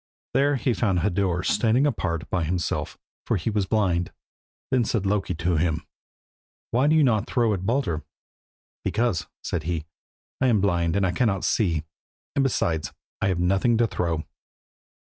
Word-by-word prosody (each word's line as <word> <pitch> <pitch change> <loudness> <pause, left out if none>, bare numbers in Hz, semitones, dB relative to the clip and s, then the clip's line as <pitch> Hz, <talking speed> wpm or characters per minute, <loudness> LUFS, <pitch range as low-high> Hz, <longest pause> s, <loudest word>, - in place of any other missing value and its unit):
There 140 +3 +3
he 125 -1 +1
found 95 -7 +1
Hodur 90 -2 0
standing 115 +6 +3
apart 85 - -1
by 90 -2 +1
himself, 85 +1 -2 0.3
for - - +2
he 105 +6 -2
was 105 -3 0
blind. 90 -6 +1 0.6
Then 130 -2 +3
said 110 -2 -1
Loki 95 -2 0
to 85 0 0
him 80 0 0 0.9
"Why 125 +4 +3
do 155 - +4
you 155 - +5
not 110 -3 +2
throw 115 -4 +2
at 95 -1 -3
Baldur?" 115 - 0 0.8
"Because," 115 -6 0 0.2
said 85 - -2
he, 80 -3 -2 0.6
"I 130 - +4
am 115 -4 +4
blind 85 -4 +1
and 95 -3 +1
cannot 100 -5 +1
see 95 -7 +2
him, 80 -1 -2 0.5
and 140 - +3
besides 85 - 0 0.3
I - - +2
have 95 -3 0
nothing 95 +6 +2
to 120 - +4
throw." 85 -6 -2
100 Hz, 165 wpm, -25 LUFS, 85-120 Hz, 0.9 s, you